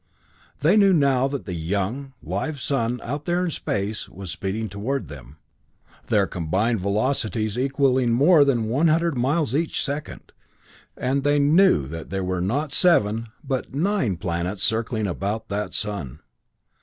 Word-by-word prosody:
They 170 Hz, +9 st, +4 dB
knew 200 Hz, -2 st, +5 dB
now 135 Hz, -5 st, +3 dB
that 140 Hz, -1 st, -5 dB
the 90 Hz, -, -5 dB
young, 100 Hz, +11 st, -3 dB
live 100 Hz, -, -3 dB
sun, 125 Hz, -2 st, -1 dB
out 145 Hz, +4 st, -4 dB
there 175 Hz, +1 st, +1 dB
in 170 Hz, -, -2 dB
space, 100 Hz, -5 st, -3 dB
was 95 Hz, -1 st, -8 dB
speeding 105 Hz, +3 st, -3 dB
toward 110 Hz, +8 st, -3 dB
them, 70 Hz, -1 st, -11 dB, 0.7 s
their -, -, +3 dB
combined 95 Hz, +7 st, -1 dB
velocities 110 Hz, +1 st, 0 dB
equalling 130 Hz, -1 st, +2 dB
more 145 Hz, +6 st, +6 dB
than 120 Hz, -6 st, +1 dB
100 160 Hz, +5 st, +2 dB
miles 135 Hz, +2 st, 0 dB
each 160 Hz, +3 st, 0 dB
second. 145 Hz, +2 st, -5 dB, 0.7 s
And 135 Hz, +2 st, 0 dB
they 145 Hz, +1 st, +2 dB
knew 150 Hz, -, +4 dB
that 80 Hz, +4 st, -7 dB
there 95 Hz, 0 st, -2 dB
were 90 Hz, -1 st, -1 dB
not 135 Hz, -, -1 dB
seven, 115 Hz, -, +3 dB, 0.2 s
but 135 Hz, -2 st, -3 dB
nine 165 Hz, -, 0 dB
planets 90 Hz, +3 st, -3 dB
circling 110 Hz, -1 st, 0 dB
about 100 Hz, +4 st, -3 dB
that 105 Hz, +1 st, -2 dB
sun. 100 Hz, -, -4 dB
120 Hz, 145 wpm, -23 LUFS, 100-140 Hz, 0.7 s, more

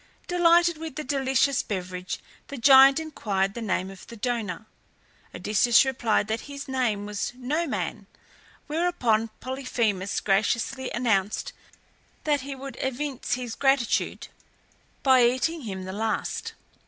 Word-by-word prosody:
Delighted 345 Hz, -1 st, +4 dB
with 320 Hz, -4 st, -6 dB
the 305 Hz, -, -4 dB
delicious 270 Hz, 0 st, +1 dB
beverage 180 Hz, -2 st, -4 dB, 0.3 s
the 280 Hz, -, -7 dB
giant 270 Hz, +3 st, +7 dB
inquired 200 Hz, -11 st, -2 dB
the 235 Hz, -, -6 dB
name 190 Hz, -3 st, -1 dB
of 195 Hz, -, -13 dB
the 235 Hz, -, -10 dB
donor. 220 Hz, -5 st, -3 dB, 0.7 s
Odysseus 230 Hz, +5 st, +4 dB
replied 235 Hz, -5 st, +1 dB
that 220 Hz, +1 st, -1 dB
his 280 Hz, 0 st, -7 dB
name 245 Hz, -6 st, -1 dB
was 210 Hz, +3 st, -3 dB
Noman, 290 Hz, +6 st, -2 dB, 0.6 s
whereupon 295 Hz, -9 st, +1 dB
Polyphemus, 235 Hz, -7 st, -1 dB
graciously 225 Hz, +6 st, 0 dB
announced 215 Hz, -5 st, 0 dB, 0.7 s
that 295 Hz, -2 st, +1 dB
he 275 Hz, +1 st, -6 dB
would 270 Hz, -2 st, -8 dB
evince 265 Hz, -1 st, -2 dB
his 245 Hz, -2 st, -5 dB
gratitude 270 Hz, -3 st, +1 dB, 0.7 s
by 260 Hz, -2 st, +6 dB
eating 260 Hz, +7 st, +1 dB
him 190 Hz, -6 st, -5 dB
the 185 Hz, -, -6 dB
last. 220 Hz, +2 st, -2 dB
250 Hz, 125 wpm, -26 LUFS, 215-275 Hz, 0.7 s, giant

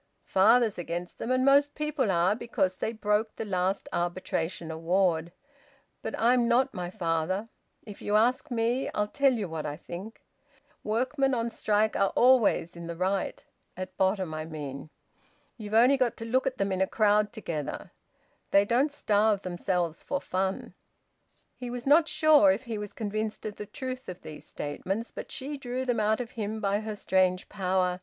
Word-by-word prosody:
"Father's 220 Hz, +1 st, +4 dB
against 175 Hz, +1 st, -5 dB
them, 230 Hz, -, -4 dB
and 255 Hz, 0 st, +2 dB
most 285 Hz, +1 st, +4 dB
people 300 Hz, -6 st, -1 dB
are, 180 Hz, +2 st, +3 dB
because 190 Hz, -6 st, -1 dB
they -, -, -2 dB
broke 215 Hz, 0 st, 0 dB
the -, -, -4 dB
last 190 Hz, 0 st, -1 dB
arbitration 175 Hz, -1 st, -2 dB
award. 170 Hz, 0 st, +1 dB, 0.7 s
But -, -, -4 dB
I'm 240 Hz, +1 st, +4 dB
not 255 Hz, +3 st, +3 dB
my 180 Hz, -1 st, -4 dB
father. 180 Hz, +3 st, -1 dB, 0.4 s
If 205 Hz, -3 st, -10 dB
you 205 Hz, -, 0 dB
ask 235 Hz, +4 st, +2 dB
me, 240 Hz, +2 st, 0 dB
I'll 210 Hz, 0 st, +1 dB
tell 275 Hz, +4 st, +3 dB
you 215 Hz, -5 st, -2 dB
what 160 Hz, -2 st, -4 dB
I 145 Hz, 0 st, -5 dB
think 190 Hz, +9 st, -9 dB, 0.6 s
workmen 260 Hz, +5 st, +1 dB
on 230 Hz, 0 st, -1 dB
strike 215 Hz, 0 st, +1 dB
are 195 Hz, -, +3 dB
always 240 Hz, -9 st, +4 dB
in 170 Hz, 0 st, -8 dB
the 170 Hz, -, -5 dB
right; 190 Hz, +3 st, -2 dB, 0.3 s
at 185 Hz, 0 st, -6 dB
bottom 190 Hz, -3 st, 0 dB
I 155 Hz, 0 st, -3 dB
mean. 150 Hz, -2 st, -7 dB, 0.7 s
You've 215 Hz, -2 st, -5 dB
only 250 Hz, +5 st, +6 dB
got 250 Hz, -3 st, 0 dB
to 225 Hz, -, -6 dB
look 255 Hz, +3 st, +1 dB
at 260 Hz, -, -2 dB
them 195 Hz, 0 st, 0 dB
in 190 Hz, 0 st, -1 dB
a 190 Hz, -, +3 dB
crowd 210 Hz, 0 st, +2 dB
together. 165 Hz, -9 st, -5 dB, 0.6 s
They 200 Hz, 0 st, +5 dB
don't 255 Hz, +7 st, +2 dB
starve 210 Hz, -7 st, +2 dB
themselves 175 Hz, -2 st, -2 dB
for 280 Hz, -, -2 dB
fun." 190 Hz, -3 st, -2 dB, 0.8 s
He 250 Hz, -1 st, -6 dB
was 245 Hz, 0 st, -5 dB
not 305 Hz, +4 st, +5 dB
sure 305 Hz, -13 st, +5 dB
if 200 Hz, +7 st, -2 dB
he 225 Hz, -3 st, -4 dB
was 210 Hz, -1 st, -6 dB
convinced 215 Hz, 0 st, -3 dB
of 210 Hz, -1 st, -5 dB
the 210 Hz, -, -7 dB
truth 260 Hz, 0 st, -6 dB
of 180 Hz, 0 st, -8 dB
these 155 Hz, -, -10 dB
statements; 190 Hz, +10 st, -4 dB
but -, -, -8 dB
she 285 Hz, +2 st, -4 dB
drew 255 Hz, 0 st, -3 dB
them 245 Hz, -3 st, 0 dB
out 215 Hz, +2 st, +2 dB
of 245 Hz, -1 st, -5 dB
him 220 Hz, -1 st, -4 dB
by 200 Hz, 0 st, +1 dB
her 215 Hz, 0 st, -5 dB
strange 185 Hz, -2 st, +1 dB
power. 185 Hz, -2 st, 0 dB
210 Hz, 180 wpm, -28 LUFS, 185-240 Hz, 0.8 s, only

